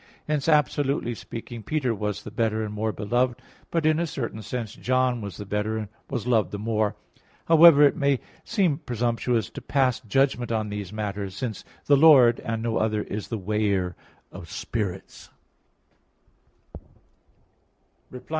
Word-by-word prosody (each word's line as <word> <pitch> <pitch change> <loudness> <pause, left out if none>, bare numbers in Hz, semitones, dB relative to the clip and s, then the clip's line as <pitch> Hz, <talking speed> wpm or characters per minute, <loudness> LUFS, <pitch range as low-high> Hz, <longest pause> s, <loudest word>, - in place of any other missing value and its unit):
Hence, 150 0 0
absolutely 145 -4 +1
speaking, 115 +1 -8
Peter 135 -1 -1
was 105 -1 -3
the 105 - -8
better 110 -1 0
and 105 -1 -5
more 110 +1 -1
beloved; 120 +4 0 0.3
but, 165 -2 -1
in 155 0 +3
a 170 - 0
certain 115 -7 -5
sense, 115 0 -5
John 130 -1 0
was 100 -2 -7
the 105 - -7
better, 105 +2 -2
and 105 -2 -5 0.2
was 120 -4 -3
loved 115 -4 +2
the 105 - -5
more. 110 0 -1 0.5
However, 165 -2 +8
it 145 - +5
may 140 -2 +1 0.2
seem 185 -10 +1
presumptuous 120 - -1
to - - -8
pass 130 -4 +1
judgment 125 +1 0
on 110 -2 -1
these 105 -2 -5
matters; 100 -2 -4
since 110 -1 -4 0.2
"the 145 - +5
Lord" 135 -6 +7
and 115 -1 -3
no 115 -1 0
other 110 -1 0
"is 105 0 -5
the 115 - -3
weigher 100 -3 -1 0.4
of 85 - -10
spirits" 100 -2 -5 2.8
(Prov. 125 - -10
115 Hz, 155 wpm, -25 LUFS, 105-135 Hz, 2.8 s, However